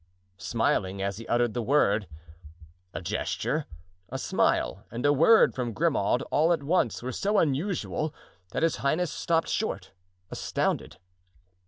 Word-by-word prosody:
smiling 100 -1 0
as 100 +1 -2
he 115 - -9
uttered 120 -2 +1
the 120 - -2
word. 110 -5 +2 0.8
A 95 - -6
gesture, 115 - -2 0.4
a - - -4
smile 75 - 0
and 120 +3 -4
a 145 - +5
word 165 +11 +5
from 120 -3 -3
Grimaud, 125 -6 +1
all 160 +4 +3
at 165 -4 +1
once, 140 -7 +1
were 130 - -3
so 205 - 0
unusual 155 +1 0 0.4
that - - -2
his 165 - +2
highness 155 +5 0
stopped 165 -1 0
short, 220 - -2 0.4
astounded. - - -2
130 Hz, 140 wpm, -27 LUFS, 110-165 Hz, 0.8 s, a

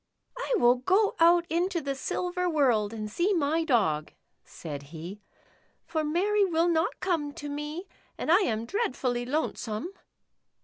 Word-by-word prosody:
" - - -53
I - - -1
will 245 -5 +5
go 385 - +2
out 340 +1 +5
into 345 +2 0
the 280 -3 -3
silver 360 +6 -2
world 245 -10 +2
and 215 -2 -5
see 350 - +1
my 320 +1 +1
Dog," 195 - +1 0.3
said 145 -4 -7
he, 170 +6 -8 0.3
" - - -38
for 320 -2 -2
Mary 390 +7 +2
will 340 -2 +2
not 325 -1 0
come 330 -6 0
to 290 - -7
me, 295 +5 -5 0.3
and - - -1
I 355 - +7
am 230 - -1
dreadfully 250 - -1
lonesome." 265 - -2
310 Hz, 160 wpm, -28 LUFS, 240-350 Hz, 0.3 s, I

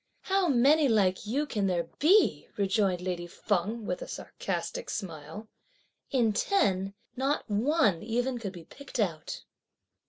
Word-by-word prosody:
"How 385 -1 +1
many 285 +2 +5
like 200 -3 +2
you 275 +7 0
can 210 -8 -1
there 170 -3 0
be!" 380 +8 +4
rejoined 195 -2 +1
lady 180 -1 -3
Feng 205 +5 -2
with 180 -2 -3
a - - -6
sarcastic - - -4
smile; 165 +1 -6 0.6
"in 235 -6 +2
ten, 195 - +1 0.2
not 270 +3 0
one 215 - +2
even 245 +3 -1
could 200 -4 -5
be 170 -3 -10
picked 280 - -9
out!" 165 -7 -2
215 Hz, 135 wpm, -29 LUFS, 185-270 Hz, 0.6 s, many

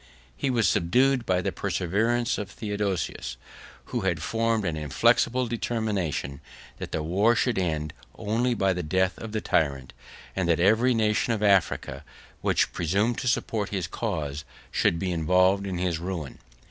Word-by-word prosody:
He 135 - -1
was 120 -4 +2
subdued 125 +8 +2
by 90 -1 +2
the - - -1
perseverance 115 +7 0
of 105 -2 -5
Theodosius; 100 - -3 0.6
who 120 - 0
had 85 -5 -1
formed 115 -2 0
an 85 -3 -1
inflexible 115 - +2
determination, 105 - -2 0.4
that - - -6
the 80 - -2
war 100 +9 +3
should 115 0 +1
end 80 -4 -2 0.2
only 115 +3 0
by 95 -2 +2
the 90 - -3
death 95 +3 +1
of 110 - -7
the 110 0 -2
tyrant; 70 -8 0 0.4
and 95 -3 0
that 85 - +3
every 110 +7 +4
nation 110 +1 +1
of 105 -2 -2
Africa, 100 -3 +2 0.4
which - - +1
presumed 100 +8 0
to - - -3
support 110 -3 0
his 95 -4 -2
cause, 80 -8 -3 0.3
should 85 - +2
be 95 +1 -2
involved 90 +4 +2
in 95 -2 -3
his 90 -2 -1
ruin. 85 -5 -5
95 Hz, 160 wpm, -26 LUFS, 85-115 Hz, 0.6 s, every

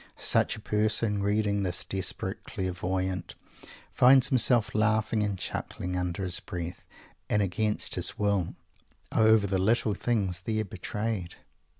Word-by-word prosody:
Such - - +2
a - - -9
person, 105 -1 +1
reading 100 0 +1
this 90 -3 -1
desperate 95 -2 -4
"clairvoyant," 95 0 -3 0.6
finds 130 +1 +6
himself 120 -4 +3
laughing 110 0 +2
and 105 -2 -1
chuckling, 90 0 -4
under 90 +1 -2
his 90 -1 -1
breath, 85 0 -7 0.4
and 105 - +2
against 105 +3 -1
his - - 0
willy 100 -4 0 0.6
over 110 -2 +5
the 95 -1 0
little 110 +2 +2
things 100 -4 -1
there 110 +1 -1
betrayed. 105 -1 -4
100 Hz, 125 wpm, -28 LUFS, 95-110 Hz, 0.6 s, finds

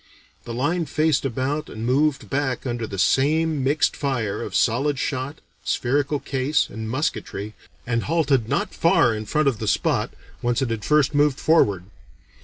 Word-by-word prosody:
The 120 - -5
line 160 +6 0
faced 155 0 +1
about 135 +4 -2
and 110 +1 -6
moved 140 +3 +1
back 135 -2 -2
under 120 -3 -3
the 100 - -6
same 150 - +2
mixed 145 +3 +2
fire 120 -8 -2
of - - -5
solid 135 +5 +2
shot, 130 +3 -3 0.2
spherical 145 +3 0
case, 135 +3 0
and 110 +1 -5
musketry, 110 -5 -3 0.3
and 115 -1 -1
halted 140 -8 +1
not - - -1
far 120 - +3
in 110 0 -5
front 155 +4 +1
of 125 -6 +1
the 110 - -3
spot - - +1 0.3
whence 120 0 0
it 130 -4 -1
had 110 -2 -3
first 150 +1 +3
moved 145 -1 +2
forward. 105 - +3
135 Hz, 165 wpm, -23 LUFS, 115-150 Hz, 0.3 s, far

